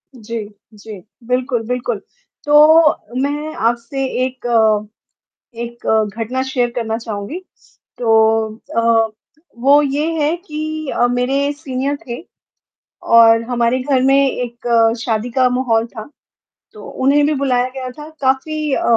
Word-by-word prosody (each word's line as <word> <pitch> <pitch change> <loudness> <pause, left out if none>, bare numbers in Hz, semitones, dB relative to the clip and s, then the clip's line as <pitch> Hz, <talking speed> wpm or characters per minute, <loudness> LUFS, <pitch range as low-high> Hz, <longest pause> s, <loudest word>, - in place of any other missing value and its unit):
जी, 230 -1 -6 0.3
जी। 210 -1 -10 0.3
बिल्कुल, 250 -1 0
बिल्कुल। 245 -2 -2 0.5
तो 300 -4 +5
मैं 295 +2 -2
आपसे 235 +4 -1 0.2
एक 260 -1 -8
अ, 220 -3 +3 0.7
एक 235 +1 -8 0.3
घटना 240 +3 -2
शेयर 255 -2 -1
करना 225 -2 -1
चाहूँगी। 220 - -5 0.6
तो 220 -1 +2 0.2
अ, 230 -1 +3 0.5
वो 280 +4 +5
ये 290 +2 -1 0.2
है 310 +4 +1
कि 310 -3 -5
अ, 240 - +2
मेरे 270 +4 0
सीनियर 280 -1 -3
थे 240 +3 -6 0.8
और 230 0 +6
हमारे 240 +1 +1
घर 265 -1 +1
में 270 +1 +4
एक 240 -1 -5 0.4
शादी 225 +1 -1
का 255 +1 +3
माहौल 240 -3 +1
था 230 +2 -10 0.6
तो 430 - -12
उन्हें 280 +2 +2
भी 305 - +1
बुलाया 255 -3 +1
गया 260 -1 -5
था 295 +4 -10
काफ़ी 290 +3 0
अ - - -1
250 Hz, 130 wpm, -17 LUFS, 230-280 Hz, 0.8 s, और